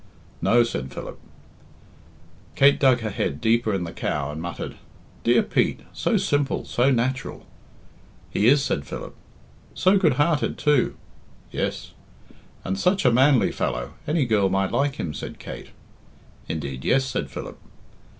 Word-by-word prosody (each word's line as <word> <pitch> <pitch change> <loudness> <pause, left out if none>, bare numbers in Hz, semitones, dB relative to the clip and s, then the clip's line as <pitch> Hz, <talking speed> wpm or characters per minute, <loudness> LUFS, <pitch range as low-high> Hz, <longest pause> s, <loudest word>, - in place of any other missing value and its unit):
"No," 120 0 +4
said 70 - -4
Philip. - - -8 1.4
Kate 140 +1 +5
dug 130 -3 +4
her 110 -1 -3
head 70 -6 -2
deeper 115 0 +2
in 95 -3 -1
the 85 - -5
cow, 75 -1 -2
and 75 +2 -6
muttered, 85 0 -6 0.5
"Dear - - +4
Pete! - - 0
So - - +1
simple, 145 -1 0
so 125 +3 +2
natural." 130 +1 -1 0.9
"He 105 - +2
is," 135 +2 +5
said 70 - -2
Philip. - - -7 0.6
"So 190 +2 +4
good 160 -7 +3
hearted, 145 +3 +1
too." 145 -4 +2 0.6
"Yes." - - -3 0.7
"And 95 +1 -2
such 185 -3 +2
a 125 - +6
manly 130 +2 +4
fellow - - -3
any 150 -2 +1
girl 105 -4 +2
might 95 0 0
like 140 0 +1
him," 80 - -4
said 70 - -7
Kate. - - -9 0.8
"Indeed, 70 -5 -4
yes," 135 0 +2
said - - -3
Philip. - - -8
120 Hz, 145 wpm, -24 LUFS, 90-140 Hz, 1.4 s, a